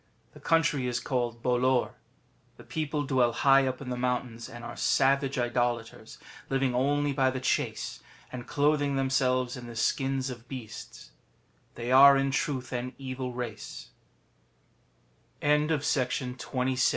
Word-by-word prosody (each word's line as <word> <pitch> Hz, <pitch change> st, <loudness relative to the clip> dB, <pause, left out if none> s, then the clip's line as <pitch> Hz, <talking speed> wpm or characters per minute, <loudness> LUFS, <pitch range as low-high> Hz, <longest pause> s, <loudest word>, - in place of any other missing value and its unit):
The -, -, -13 dB
country 160 Hz, -5 st, +2 dB
is 120 Hz, -1 st, -1 dB
called 120 Hz, -3 st, -2 dB
Bolor. 125 Hz, 0 st, +2 dB, 0.7 s
The -, -, -13 dB
people 150 Hz, -1 st, -2 dB
dwell 130 Hz, -4 st, +2 dB
high 135 Hz, -1 st, +4 dB
up 130 Hz, +1 st, -3 dB
in 130 Hz, -2 st, -5 dB
the -, -, -1 dB
mountains, 125 Hz, -2 st, -2 dB
and 120 Hz, 0 st, -10 dB
are 120 Hz, 0 st, -7 dB
savage 135 Hz, 0 st, +2 dB
Idolaters, 120 Hz, -1 st, -2 dB, 0.3 s
living 135 Hz, -2 st, +1 dB
only 145 Hz, +3 st, +1 dB
by 135 Hz, -1 st, +3 dB
the 130 Hz, 0 st, -3 dB
chase, 130 Hz, -, -1 dB, 0.3 s
and 125 Hz, -1 st, -7 dB
clothing 145 Hz, -1 st, +1 dB
themselves 130 Hz, -1 st, +1 dB
in 125 Hz, -2 st, -8 dB
the 120 Hz, -, -9 dB
skins 135 Hz, +1 st, 0 dB
of 120 Hz, -1 st, -10 dB
beasts. 120 Hz, -5 st, -9 dB, 0.6 s
They 120 Hz, +1 st, -4 dB
are 140 Hz, +1 st, +9 dB
in 135 Hz, 0 st, +1 dB
truth 135 Hz, -1 st, -2 dB
an 125 Hz, +1 st, -3 dB
evil 130 Hz, -1 st, -5 dB
race. 120 Hz, -4 st, -6 dB
130 Hz, 130 wpm, -28 LUFS, 120-135 Hz, 0.7 s, are